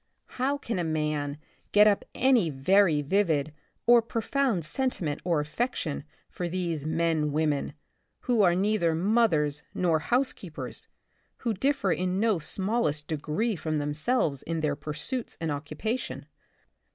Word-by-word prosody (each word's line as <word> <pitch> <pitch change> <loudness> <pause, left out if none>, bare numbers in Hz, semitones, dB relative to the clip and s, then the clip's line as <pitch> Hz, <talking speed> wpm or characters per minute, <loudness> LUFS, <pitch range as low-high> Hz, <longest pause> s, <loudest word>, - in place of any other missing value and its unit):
How 280 +2 +2
can 230 -8 -3
a - - 0
man 150 -2 -1 0.4
get 210 0 +7
up 205 -2 +3
any 250 -9 +4
very 155 +3 +3
vivid 155 -3 +1 0.3
or 240 0 +7
profound 230 - -1
sentiment 165 - -2
or 170 -3 +1
affection 150 - -2 0.2
for 175 -1 -4
these 170 -4 -2
men 160 -2 +1
women 150 -1 0 0.2
— - - -48
who 240 -4 +2
are 175 -3 +4
neither 190 -4 +2
mothers 165 -7 +2
nor 170 -3 +2
housekeepers, 245 - -2 0.5
who 235 -3 -1
differ 265 -2 +1
in 185 +2 0
no 215 -4 +2
smallest 160 -3 0
degree 160 +9 -1
from 155 -2 -2
themselves 150 - 0
in 165 -1 -3
their 150 -2 0
pursuits 150 - -4
and 165 -2 -2
occupation 155 - -4
170 Hz, 135 wpm, -28 LUFS, 150-220 Hz, 0.5 s, get